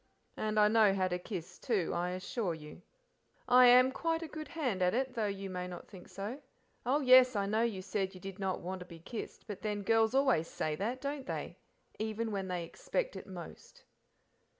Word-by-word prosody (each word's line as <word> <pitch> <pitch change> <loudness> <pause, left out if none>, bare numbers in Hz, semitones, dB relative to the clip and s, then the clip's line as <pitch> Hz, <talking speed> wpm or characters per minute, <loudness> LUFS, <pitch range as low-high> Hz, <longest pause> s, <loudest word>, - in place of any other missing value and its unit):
"And 215 0 0
I 210 - +7
know 215 -2 +5
how 185 -1 +2
to 180 0 -2
kiss, 180 -3 -7
too, 205 -9 0
I 175 +1 0
assure 185 0 -2
you. 150 +2 -11 0.7
I 250 0 +8
am 250 +1 +7
quite 330 +3 -1
a - - -5
good 310 0 -7
hand 255 - -2
at 180 +3 +3
it, 260 0 0
though 225 -4 0
you 195 -1 -4
may 180 0 -3
not 180 -1 -8
think 185 -4 -12
so. 210 +8 -6 0.5
Oh 280 +4 +3
yes, 255 -2 +7
I 200 -1 +1
know 215 +3 +1
you 215 -5 -1
said 190 -1 -2
you - - -9
did 195 +1 -8
not 190 -1 -1
want 185 +2 -4
to 180 - -8
be 170 - -10
kissed; 215 +8 -7
but 205 -3 -7
then, 210 -2 -2
girls 225 +3 +3
always 265 - +3
say 155 -2 -2
that, 235 +9 -3
don't 280 -1 -4
they? - - -4 0.4
even 220 +1 -2
when 195 -2 -2
they 180 -2 -2
expect - - -3
it - - -8
most." - - -10
210 Hz, 210 wpm, -33 LUFS, 185-250 Hz, 0.7 s, I